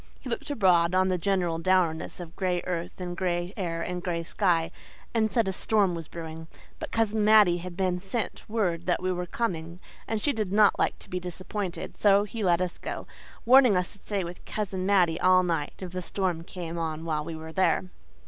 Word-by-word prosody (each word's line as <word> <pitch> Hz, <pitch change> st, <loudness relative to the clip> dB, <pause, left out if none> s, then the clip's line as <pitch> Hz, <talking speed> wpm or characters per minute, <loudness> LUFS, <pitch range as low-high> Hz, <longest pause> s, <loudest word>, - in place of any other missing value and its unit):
He 255 Hz, -, -7 dB
looked 280 Hz, +5 st, -3 dB
abroad 180 Hz, -9 st, +3 dB
on 185 Hz, 0 st, +3 dB
the 180 Hz, -1 st, 0 dB
general 175 Hz, -3 st, 0 dB
dourness 175 Hz, -2 st, +1 dB
of 170 Hz, -1 st, -9 dB
gray 180 Hz, -2 st, -1 dB
earth 175 Hz, +1 st, -4 dB
and 175 Hz, -1 st, -4 dB
gray 175 Hz, 0 st, -1 dB
air 165 Hz, -4 st, -2 dB
and 180 Hz, 0 st, -4 dB
gray 170 Hz, -2 st, -2 dB
sky, 170 Hz, -2 st, +1 dB, 0.4 s
and 220 Hz, -2 st, +2 dB
said 230 Hz, -5 st, +2 dB
a -, -, +1 dB
storm 200 Hz, -1 st, +1 dB
was 165 Hz, -2 st, -6 dB
brewing. 160 Hz, -1 st, -8 dB, 0.3 s
But -, -, -5 dB
Cousin 220 Hz, -1 st, +1 dB
Mattie 210 Hz, -5 st, +6 dB
had 175 Hz, 0 st, -8 dB
been 185 Hz, -2 st, 0 dB
sent 195 Hz, +5 st, -3 dB
word 180 Hz, -6 st, -1 dB
that 180 Hz, -, +1 dB
we 185 Hz, -, +1 dB
were 180 Hz, 0 st, -3 dB
coming, 170 Hz, -6 st, -3 dB, 0.3 s
and 225 Hz, -, -1 dB
she 285 Hz, +6 st, +1 dB
did 215 Hz, -4 st, -2 dB
not 210 Hz, 0 st, +4 dB
like -, -, +1 dB
to -, -, -15 dB
be 180 Hz, -, -1 dB
disappointed, 180 Hz, +1 st, -5 dB
so 200 Hz, -1 st, +5 dB
he 215 Hz, +1 st, -5 dB
let 175 Hz, -2 st, +3 dB
us 180 Hz, -1 st, -3 dB
go, -, -, -5 dB, 0.4 s
warning 250 Hz, -4 st, +7 dB
us 180 Hz, -1 st, -1 dB
to 200 Hz, -, -16 dB
stay 200 Hz, -3 st, -2 dB
with 175 Hz, +1 st, -8 dB
Cousin 190 Hz, -3 st, -3 dB
Mattie 180 Hz, -5 st, +3 dB
all 185 Hz, 0 st, +5 dB
night 165 Hz, -4 st, -1 dB
if 185 Hz, -2 st, -7 dB
the 185 Hz, 0 st, -4 dB
storm 180 Hz, -2 st, -2 dB
came 170 Hz, -1 st, -6 dB
on 160 Hz, 0 st, -3 dB
while 155 Hz, -2 st, -1 dB
we 165 Hz, +1 st, -6 dB
were 160 Hz, 0 st, -8 dB
there. 190 Hz, +1 st, +2 dB
180 Hz, 210 wpm, -27 LUFS, 170-200 Hz, 0.4 s, warning